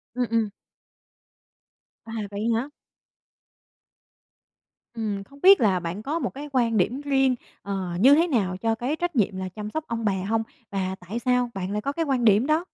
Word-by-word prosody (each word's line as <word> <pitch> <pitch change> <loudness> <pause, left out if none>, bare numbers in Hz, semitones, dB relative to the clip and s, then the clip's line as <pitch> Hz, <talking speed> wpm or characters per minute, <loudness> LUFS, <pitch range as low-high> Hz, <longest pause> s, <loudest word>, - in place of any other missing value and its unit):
Ừm, 250 0 +1
ừm. 225 -2 +2 1.6
À, 225 - -9 0.2
vậy 200 0 -4
hả? 245 +5 -2 2.3
Ừm, 210 -3 -3
không 280 +7 -18
biết 390 +1 +8
là 195 -5 +3
bạn 175 +4 -5
có 305 +6 -1
một - - -1
cái 290 +2 -7
quan 235 -4 +2
điểm 245 +8 +1
riêng, 270 -3 +2 0.3
ờ, 195 -3 -3
như 260 +8 +7
thế 335 +3 +3
nào 200 - 0
cho 225 +3 0
cái 250 +7 -2
trách 350 0 -3
nhiệm 200 -5 +1
là 190 0 -4
chăm 210 +3 -6
sóc 315 - -2
ông 230 -1 -3
bà 205 - +3
hông? 205 +4 -1 0.3
Và 190 -1 -2
tại 220 +6 -3
sao 250 0 +1
bạn 190 -1 -4
lại 210 +1 -1
có 280 - -1
cái 330 +3 -1
quan 260 -4 +1
điểm 215 +4 +5
đó? 315 +3 +2
230 Hz, 190 wpm, -25 LUFS, 200-275 Hz, 2.3 s, biết